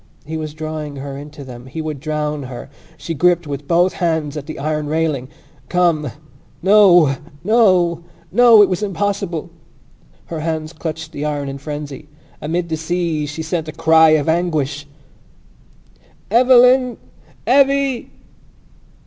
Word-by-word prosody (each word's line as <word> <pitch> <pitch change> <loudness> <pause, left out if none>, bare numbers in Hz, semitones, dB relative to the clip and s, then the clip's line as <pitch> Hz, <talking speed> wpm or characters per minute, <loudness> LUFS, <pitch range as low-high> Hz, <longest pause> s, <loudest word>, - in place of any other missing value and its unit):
He 160 +2 -6
was 155 -1 -5
drawing 155 -2 -5
her 140 0 -7
into 145 +1 -10
them: 125 -1 -11
he 130 - -7
would 155 -3 -4
drown 150 0 -3
her. 130 +2 -9 0.3
She 165 - -5
gripped 175 +2 +2
with 140 -1 -6
both 175 +2 +3
hands 160 -4 -1
at 145 -2 -6
the 155 - -7
iron 150 +1 -2
railing. 155 -4 -1 0.4
"Come!" 170 -5 +1 0.5
No! 175 -8 +6 0.3
No! 185 -6 +3 0.3
No! 230 0 +7
It - - +3
was 185 +1 -2
impossible. 195 -4 -2 0.7
Her 165 - -6
hands 160 0 -3
clutched 160 -1 -6
the 145 - -5
iron 145 -2 -2
in 135 0 -6
frenzy. 145 -1 -7 0.3
Amid 170 +3 -2
the 160 - -2
seas 160 -2 -2
she 160 +2 -5
sent 160 0 -3
a - - -4
cry 160 0 +5
of 145 - -4
anguish! 155 -4 -1 1.4
"Eveline! 250 +1 +5 0.5
Evvy!" 275 -1 +2
160 Hz, 140 wpm, -18 LUFS, 150-180 Hz, 1.4 s, No